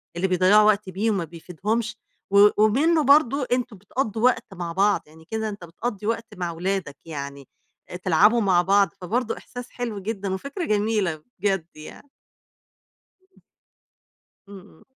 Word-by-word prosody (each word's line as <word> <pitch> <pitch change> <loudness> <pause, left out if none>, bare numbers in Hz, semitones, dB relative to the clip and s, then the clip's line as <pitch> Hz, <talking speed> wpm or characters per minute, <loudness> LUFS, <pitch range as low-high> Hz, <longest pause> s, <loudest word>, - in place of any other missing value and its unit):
اللي 185 +2 0
بيضيّعوا 185 +3 +5
وقت 205 -2 +2
بيه 205 +5 0
وما 195 -5 -1
بيفيدهمش، 205 +7 -4 0.3
و 200 +1 +8
ومنه 290 +10 +3
برضه 280 -2 +4
أنتم 245 -4 -1
بتقضّوا 220 +2 -3
وقت 235 -5 +2
مع 175 -2 -5
بعض، 200 +3 +2
يعني 160 +1 -18
كده 220 +3 -3
أنت 200 -3 -8
بتقضّي 205 +4 -5
وقت 230 0 -2
مع 175 -2 -2
ولادك 180 -3 -3
يعني، 140 -3 -7 0.6
تلعبوا 210 +7 +4
مع 185 -3 +3
بعض 195 -1 +3
فبرضه 230 +6 -2
إحساس 245 -1 -9
حلو 235 -5 -5
جدًا 200 -1 -3
وفكرة 280 - -4
جميلة، 205 -7 0 0.2
بجد 190 -4 0
يعني. 155 - -12 2.4
إمم. 200 -1 -10
إمم. 170 - -19
205 Hz, 140 wpm, -24 LUFS, 180-230 Hz, 2.4 s, و